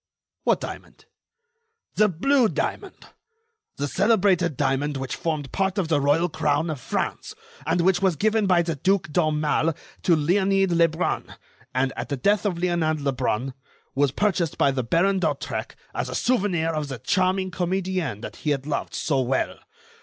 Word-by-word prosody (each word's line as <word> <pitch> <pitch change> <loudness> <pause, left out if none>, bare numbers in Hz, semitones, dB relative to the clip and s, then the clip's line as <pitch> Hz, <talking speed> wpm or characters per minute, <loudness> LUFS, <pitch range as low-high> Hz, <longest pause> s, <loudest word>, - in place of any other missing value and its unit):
"What - - +2
diamond?" - - -9 0.9
"The 215 - +4
blue 245 - +2
diamond! 165 - -4 0.7
The 145 - -2
celebrated 185 - +2
diamond 140 0 0
which 135 -1 -4
formed 155 -5 -3
part 195 0 0
of 180 -5 0
the 150 -3 +2
royal 145 +5 +3
crown 155 0 0
of 150 - -5
France, - - -3 0.3
and 170 +2 +2
which 185 +1 +3
was 190 -3 +2
given 215 +4 +1
by 175 -2 +4
the 165 -2 -2
Duke 185 +1 +1
d'Aumale 155 0 +1 0.3
to 170 - +4
Leonide 190 +4 +2
Lebrun, 170 0 +1 0.4
and, 130 +1 +1
at - - -5
the 140 - -2
death 205 +8 +2
of 180 -4 -2
Leonide 170 -3 0
Lebrun, 135 -2 -1 0.4
was 140 -1 +2
purchased 180 -1 0
by 140 - +3
the 135 -1 -1
Baron 180 +10 +2
d'Hautrec - - -2 0.2
as - - -3
a - - -4
souvenir 190 -9 +1
of 155 -2 -2
the 135 -2 -5
charming 185 - 0
comedienne 180 - -2
that - - -8
he 150 - -3
had 140 -2 0
loved 150 - -3
so 140 -4 0
well. 130 +1 -1
165 Hz, 160 wpm, -24 LUFS, 145-190 Hz, 0.9 s, The